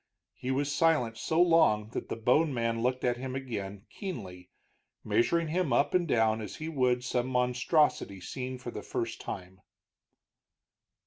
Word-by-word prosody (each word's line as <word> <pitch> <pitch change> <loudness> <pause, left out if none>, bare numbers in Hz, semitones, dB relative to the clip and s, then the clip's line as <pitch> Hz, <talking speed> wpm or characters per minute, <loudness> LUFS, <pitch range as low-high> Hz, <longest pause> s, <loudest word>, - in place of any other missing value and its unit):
He 125 - -6
was 140 +2 0
silent 150 -8 +2
so 160 +6 0
long 165 -12 +4
that - - -5
the - - -2
bone 125 +8 +3
man 115 -1 0
looked 125 +1 0
at 120 -1 +1
him 130 +1 -5
again 105 -6 -5
keenly, 90 - -7 0.5
measuring 165 +6 +1
him 170 -2 0
up 120 +4 +2
and 180 -2 +2
down 110 -4 +2
as 105 - -6
he 155 - -6
would 125 -5 +1
some 125 0 -1
monstrosity 125 - +1
seen 130 +7 -5
for 125 -1 -7
the 105 - -6
first 115 +1 -4
time. 95 0 -7
125 Hz, 155 wpm, -30 LUFS, 115-145 Hz, 0.5 s, long